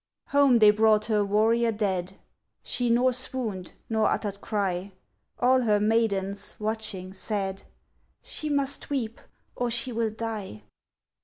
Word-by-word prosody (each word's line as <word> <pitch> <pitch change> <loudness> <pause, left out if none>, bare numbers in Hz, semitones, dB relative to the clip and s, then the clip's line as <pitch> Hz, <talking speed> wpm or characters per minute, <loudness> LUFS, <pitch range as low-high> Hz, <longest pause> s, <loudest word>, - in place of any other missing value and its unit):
Home 280 -3 +5
they 215 -2 +7
brought 215 0 +3
her 215 -2 +1
warrior 225 +3 +2
dead: 190 -4 -2 0.5
She 245 -1 -1
nor 250 +2 +3
swooned, 240 -7 -2
nor 220 -1 +1
uttered 200 -2 -3
cry; 195 -2 -2 0.4
All 255 +1 +3
her 210 -3 +2
maidens, 205 -2 +1
watching, 210 -4 -4
said, 195 -1 -1 0.6
"She 305 - -5
must 280 -1 +2
weep 240 -6 -3 0.3
or 245 -1 -1
she 240 +2 0
will 230 -1 -1
die." 215 - -6
220 Hz, 130 wpm, -26 LUFS, 200-235 Hz, 0.6 s, they